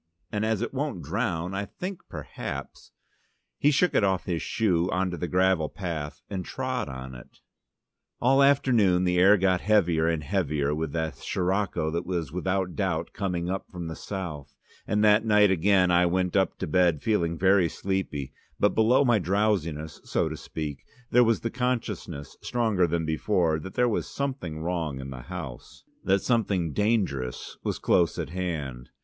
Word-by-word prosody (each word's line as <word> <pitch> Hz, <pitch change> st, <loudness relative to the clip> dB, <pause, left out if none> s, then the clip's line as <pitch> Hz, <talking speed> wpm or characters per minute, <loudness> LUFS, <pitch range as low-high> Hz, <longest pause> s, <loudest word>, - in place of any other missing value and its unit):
And 105 Hz, 0 st, -1 dB
as 110 Hz, 0 st, 0 dB
it -, -, -4 dB
won't 135 Hz, -, -3 dB
drown 95 Hz, -5 st, -2 dB
I 100 Hz, +1 st, -2 dB
think 185 Hz, -, -6 dB
perhaps -, -, -7 dB, 0.4 s
" -, -, -47 dB
He 145 Hz, -, +4 dB
shook 150 Hz, +5 st, +3 dB
it -, -, +3 dB
off 95 Hz, -3 st, +1 dB
his 85 Hz, -3 st, -2 dB
shoe 90 Hz, -6 st, +1 dB
on 95 Hz, 0 st, 0 dB
to 85 Hz, -, -4 dB
the 90 Hz, -, -3 dB
gravel 90 Hz, -3 st, +2 dB
path 80 Hz, -5 st, -5 dB
and 95 Hz, -2 st, -4 dB
trod -, -, -3 dB
on 65 Hz, 0 st, -7 dB
it. -, -, -13 dB, 0.8 s
All 135 Hz, +3 st, +4 dB
afternoon 120 Hz, -10 st, +4 dB
the 90 Hz, -1 st, +2 dB
air 100 Hz, +3 st, +7 dB
got 95 Hz, -1 st, +2 dB
heavier 85 Hz, -7 st, +3 dB
and 80 Hz, -2 st, 0 dB
heavier 75 Hz, -5 st, 0 dB
with 80 Hz, -1 st, -3 dB
the 80 Hz, -1 st, -1 dB
Sirocco 95 Hz, -3 st, -1 dB
that 85 Hz, +2 st, -2 dB
was 85 Hz, -6 st, -3 dB
without 90 Hz, +1 st, -1 dB
doubt 90 Hz, -5 st, -1 dB
coming 90 Hz, -4 st, -2 dB
up 95 Hz, +1 st, -3 dB
from 90 Hz, -2 st, -6 dB
the 80 Hz, -, -5 dB
south, 85 Hz, -8 st, -6 dB, 0.3 s
and 105 Hz, +1 st, +1 dB
that 105 Hz, +1 st, +5 dB
night 105 Hz, -2 st, +5 dB
again 95 Hz, 0 st, +3 dB
I 90 Hz, 0 st, +4 dB
went 90 Hz, 0 st, 0 dB
up 95 Hz, -1 st, +2 dB
to -, -, -3 dB
bed 85 Hz, -2 st, +2 dB
feeling 85 Hz, -7 st, +1 dB
very 95 Hz, -1 st, +4 dB
sleepy; 95 Hz, -8 st, -3 dB, 0.3 s
but 105 Hz, -, +3 dB
below 125 Hz, +5 st, +4 dB
my 120 Hz, -4 st, +4 dB
drowsiness, 90 Hz, -5 st, -1 dB
so -, -, 0 dB
to -, -, -5 dB
speak, 75 Hz, -3 st, -5 dB, 0.3 s
there 125 Hz, +1 st, +6 dB
was 115 Hz, -1 st, +2 dB
the 115 Hz, -, -2 dB
consciousness, 110 Hz, -, -3 dB
stronger 110 Hz, -7 st, +1 dB
than 85 Hz, 0 st, -1 dB
before, 80 Hz, 0 st, +1 dB
that 95 Hz, +5 st, -9 dB
there 125 Hz, -, +3 dB
was 115 Hz, -, -1 dB
something 130 Hz, -, -4 dB
wrong 80 Hz, -5 st, -2 dB
in 65 Hz, 0 st, -7 dB
the 65 Hz, -1 st, -7 dB
house, 80 Hz, -6 st, -8 dB, 0.2 s
that 95 Hz, 0 st, +2 dB
something 100 Hz, -, +1 dB
dangerous 95 Hz, -, -1 dB
was -, -, -1 dB
close 85 Hz, -3 st, +2 dB
at -, -, -4 dB
hand. 75 Hz, -9 st, -4 dB
90 Hz, 175 wpm, -27 LUFS, 80-105 Hz, 0.8 s, air